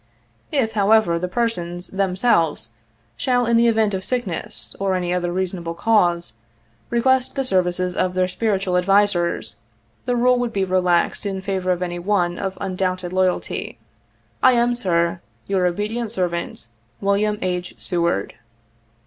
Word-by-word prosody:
If, 260 -7 +1
however, 205 -5 +3
the 180 - -2
persons 180 -5 -2
themselves 185 - +1 0.5
shall 245 - +1
in 235 0 +2
the 235 +1 +5
event 220 -2 +2
of 190 0 -2
sickness, 215 -3 -4
or 195 -1 +1
any 180 -1 -1
other 175 -1 -1
reasonable 175 -2 -3
cause, 175 - +2 0.6
require 260 +2 +3 0.2
the 270 - 0
services 180 -4 +1
of 185 0 0
their 185 0 +2
spiritual 190 -1 0
advisers, 190 -2 +1 0.5
the 245 - 0
rule 250 +1 +3
would 240 -2 -2
be 195 -1 +1
relaxed 180 -2 +1
in 195 -1 -3
favor 190 -1 -2
of 180 0 0
any 175 -1 -4
one 175 -2 0
of 190 -1 -3
undoubted 185 -1 -2
loyalty. 185 -1 -1 0.3
" - - -40 0.3
I 255 - +6
am 240 0 +3
Sir, 170 -6 0 0.2
u 195 - -2
Your 180 -1 +3
obedient 210 +5 -2
servant, 170 - -3 0.3
"WILLIAM 205 +1 +1
H. 180 -1 -3
SEWARD." 170 - -1
185 Hz, 150 wpm, -21 LUFS, 175-220 Hz, 0.6 s, I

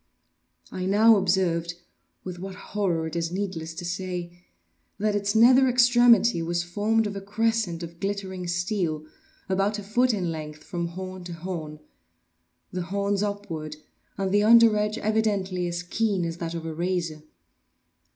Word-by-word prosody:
I 185 0 -3
now 220 +3 +6
observed—with 175 -1 -2
what 190 +1 -7
horror 185 -5 -2
it 160 - -6
is 165 0 -1
needless 175 -4 -4
to 175 +1 -6
say—that 175 - -5
its 205 +1 -1
nether 255 +4 +6
extremity 240 -5 +5
was 170 +1 -1
formed 215 +5 +1
of 205 -1 -4
a 195 - -5
crescent 210 -4 -1
of 170 0 -9
glittering 195 -2 -3
steel, 175 -3 -1 0.4
about 195 +2 0
a 210 - -6
foot 245 +5 +2
in 185 -6 -1
length 155 -1 -7
from 170 -1 -3
horn 185 +1 -7
to 175 - -6
horn; 165 -3 -6 0.9
the 180 - -3
horns 200 +2 -1
upward, 195 -7 -4 0.4
and 195 -1 -1
the 205 +1 +4
under 230 0 +7
edge 210 +1 0
evidently 200 -4 0
as 175 +1 -3
keen 195 0 0
as 165 0 -4
that 170 -1 -4
of 165 -1 -5
a 160 - -4
razor. 170 -2 -2
185 Hz, 150 wpm, -26 LUFS, 170-205 Hz, 0.9 s, under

